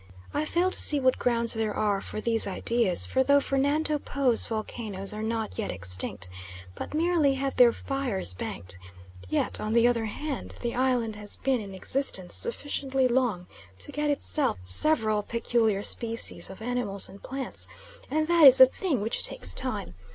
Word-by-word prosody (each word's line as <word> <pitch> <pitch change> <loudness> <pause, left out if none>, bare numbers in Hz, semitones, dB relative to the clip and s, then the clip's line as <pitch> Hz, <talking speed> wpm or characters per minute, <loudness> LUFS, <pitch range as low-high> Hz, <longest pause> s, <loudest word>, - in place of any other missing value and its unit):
I 300 +1 -1
fail 350 +4 0
to - - +4
see 295 - +8
what 260 -1 +1
grounds 235 -1 +1
there 220 -2 -2
are 205 -2 0
for - - -6
these 225 -1 +2
ideas, 205 -1 0
for 260 - 0
though 280 +2 +4
Fernando 290 +3 +1
Po's 270 -5 +1
volcanoes 215 -3 -4
are 210 - -6
not 220 -1 -3
yet - - -3
extinct, 90 0 -1 0.5
but 300 - -7
merely 320 -4 +2
have 270 0 -3
their 245 -2 +6
fires 250 - -3
banked, 90 0 -6 0.5
yet, - - -1
on 215 +1 -2
the 235 0 +4
other 235 -2 0
hand, 275 +6 -5
the 235 -1 -3
island 245 -4 0
has 210 -1 -9
been 265 -3 -1
in 195 -2 -9
existence 190 -3 -2
sufficiently 275 - +1
long 240 -8 0 0.3
to 90 - -6
get 295 0 -2
itself 290 - -1
several 215 - +2
peculiar 225 -2 -1
species 230 +1 -1
of 190 +3 -10
animals 240 -5 0
and 195 +1 -14
plants, 255 - -5 0.4
and 310 +3 0
that 335 -2 +6
is 265 0 +9
a 260 - +11
thing 275 - -2
which 220 +3 -2
takes - - +1
time. 215 - -4
235 Hz, 170 wpm, -27 LUFS, 210-275 Hz, 0.5 s, a